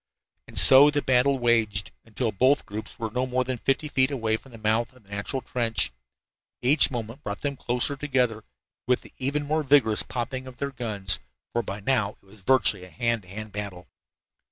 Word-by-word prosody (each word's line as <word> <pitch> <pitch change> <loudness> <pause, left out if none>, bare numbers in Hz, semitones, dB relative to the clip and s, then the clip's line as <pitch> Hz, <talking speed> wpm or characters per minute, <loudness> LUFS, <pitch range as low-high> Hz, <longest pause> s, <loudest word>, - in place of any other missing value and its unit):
And - - -7
so 135 +2 +9
the 145 -1 -1
battle 130 +2 +3
waged, 115 -4 +1
until 115 +1 -2
both 130 +8 +2
groups 105 +2 -7
were 115 -2 -4
no 125 +3 -1
more 130 0 0
than 125 -1 -4
fifty 135 +5 0
feet 130 -2 +2
away 115 -6 0
from 130 +4 -10
the 115 - -11
mouth 110 +2 0
of 125 - -21
the 100 - -25
natural 100 +6 -3
trench. 115 - -1 0.7
Each 140 +5 +5
moment 115 -1 -6
brought 100 -1 -5
them 140 -1 -2
closer 125 +2 -1
together, 125 -6 0 0.4
with 125 0 +2
the - - -16
even 145 +3 -1
more 155 +2 0
vigorous 135 -7 +4
popping 130 +1 -4
of 125 -1 -11
their 140 0 -3
guns, 105 - 0 0.3
for 120 - +1
by 100 -1 -6
now 105 -3 +1
it - - -38
was 100 +1 -18
virtually 110 -4 +2
a 90 - -11
hand 115 +6 0
to 90 - -20
hand 105 +3 -7
battle. 100 -4 -6
120 Hz, 200 wpm, -26 LUFS, 105-130 Hz, 0.7 s, so